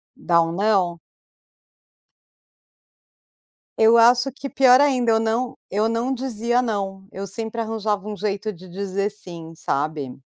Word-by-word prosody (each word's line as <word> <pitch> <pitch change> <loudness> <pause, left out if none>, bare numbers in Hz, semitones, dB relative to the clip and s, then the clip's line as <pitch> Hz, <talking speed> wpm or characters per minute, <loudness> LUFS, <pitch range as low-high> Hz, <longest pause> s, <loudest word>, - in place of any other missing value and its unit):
Dá 170 -1 +2
um 165 0 -1
não? 190 -3 +1 2.8
Eu 225 +1 +6
acho 245 +3 +5
que 275 +1 -7
pior 260 -1 +5
ainda 255 -5 +2
eu 225 - +3
não 230 +3 -1
eu 210 +3 +1
não 230 +3 -1
dizia 240 -1 -1
não, 195 -4 -4
eu 195 +1 -6
sempre 225 +4 -5
arranjava 215 -2 -2
um 210 -1 -5
jeito 205 +2 -2
de 185 -1 -13
dizer 195 +2 -3
sim, 170 -5 -11
sabe? 145 -4 -3
215 Hz, 135 wpm, -22 LUFS, 190-235 Hz, 2.8 s, Eu